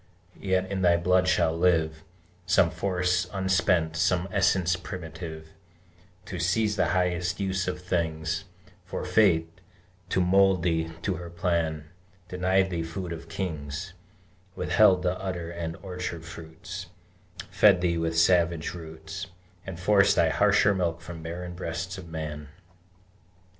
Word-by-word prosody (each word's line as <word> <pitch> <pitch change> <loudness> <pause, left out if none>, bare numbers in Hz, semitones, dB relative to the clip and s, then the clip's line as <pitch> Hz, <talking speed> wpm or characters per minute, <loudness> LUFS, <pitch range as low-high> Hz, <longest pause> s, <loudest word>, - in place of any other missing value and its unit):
Yet 95 -1 +1
in 95 -1 -1
thy 85 -2 +4
blood 90 +1 +2
shall 80 -3 +2
live 80 -3 +1 0.4
Some 90 -2 +4
force 90 -1 0
unspent, 90 -4 +1
some 90 +2 +1
essence 95 -2 +2
primitive, 80 -3 -8 0.8
To 90 0 -6
seize 105 +5 +1
the - - +2
highest 90 +1 0
use 95 -1 -1
of 90 - -2
things; 80 -1 -2 0.4
For - - -5
Fate, 85 -5 +2 0.5
to - - +1
mould 95 0 +4
thee 80 -2 0
to 95 -2 -1
her 85 -1 -8
plan, 85 -3 -1 0.4
Denied 95 +1 +1
thee 85 -1 -1
food 85 +2 -5
of 80 0 -9
kings, 80 -1 -4 0.6
Withheld 95 -4 +4
the 90 0 0
udder 90 -3 -4
and 85 -1 -4
the - - -15
orchard 90 -3 -5
fruits, 85 +2 -8 0.6
Fed 100 -4 +5
thee 85 -2 +1
with 80 0 -1
savage 85 -2 +3
roots, 80 +3 -8 0.4
And 90 -3 -6
forced 100 +2 +4
thy - - +4
harsher 100 - +4
milk 85 -3 -1
from 80 0 -8
barren 90 +2 -6
breasts 85 +2 -5
of 85 -2 -11
man! 75 -2 -5
90 Hz, 135 wpm, -27 LUFS, 80-95 Hz, 0.8 s, Fed